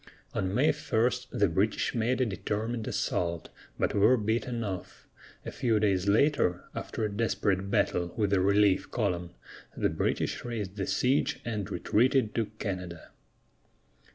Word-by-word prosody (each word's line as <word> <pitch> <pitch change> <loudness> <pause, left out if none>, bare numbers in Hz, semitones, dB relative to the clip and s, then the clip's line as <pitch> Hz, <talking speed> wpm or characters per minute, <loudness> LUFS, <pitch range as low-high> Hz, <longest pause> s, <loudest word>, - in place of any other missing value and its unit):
On 95 - -1
May 130 +9 +3
1 125 -4 +1 0.2
the 100 - +2
British 95 +6 0
made 120 +3 0
a - - +4
determined 110 +2 -3
assault, 85 -1 -2 0.3
but - - 0
were 105 +6 +5
beaten 115 +2 -1
off; 95 -4 -6 0.4
a - - -4
few 115 -3 +1
days 100 -3 +1
later, 105 -5 +3
after 110 - -3
a 105 - -2
desperate 100 -3 0
battle 85 -3 +1
with 105 -3 +1
a 95 - +3
relief 100 0 +3
column, 90 -7 -1 0.5
the - - +2
British - - -1
raised 105 -5 -4
the 95 -3 -3
siege 130 +3 +1
and 105 -4 -3
retreated 120 +2 +2
to 115 -3 0
Canada. 90 -5 -5
105 Hz, 145 wpm, -29 LUFS, 95-115 Hz, 0.5 s, were